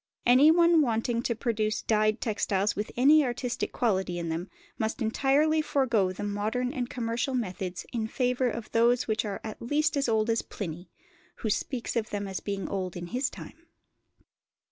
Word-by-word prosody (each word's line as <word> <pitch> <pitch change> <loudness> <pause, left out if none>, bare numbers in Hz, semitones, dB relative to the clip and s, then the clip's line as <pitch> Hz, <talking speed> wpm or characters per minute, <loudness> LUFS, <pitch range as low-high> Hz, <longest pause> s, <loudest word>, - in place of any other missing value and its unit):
Anyone 320 +6 +6
wanting 235 -2 0
to 235 -1 -1
produce 215 -2 -1
dyed 215 0 +2
textiles 205 -3 0
with 210 - -3
any 295 +5 +6
artistic 245 -1 -2
quality 190 -7 0
in 170 -1 -3
them 165 +4 -3 0.3
must 220 +3 -1
entirely 280 +7 +2
forgo 235 -10 +1
the 185 - -6
modern 215 +5 -1
and 250 -4 -3
commercial 240 +2 -2
methods 185 -5 -3
in 225 -2 -1
favour 250 +1 0
of 230 -1 -6
those 235 +2 +3
which 220 0 0
are 200 -2 -4
at 220 -1 -7
least 300 +6 +1
as 275 -3 +1
old 220 0 +2
as 225 - +1
Pliny, 175 -2 -7 0.5
who 220 - -2
speaks 245 +3 -2
of 225 -2 -1
them 205 -1 -3
as 190 -1 -4
being 200 -1 -4
old 185 -2 -3
in 175 - -5
his 255 +1 0
time. 335 +2 -12
230 Hz, 170 wpm, -28 LUFS, 205-255 Hz, 0.5 s, Anyone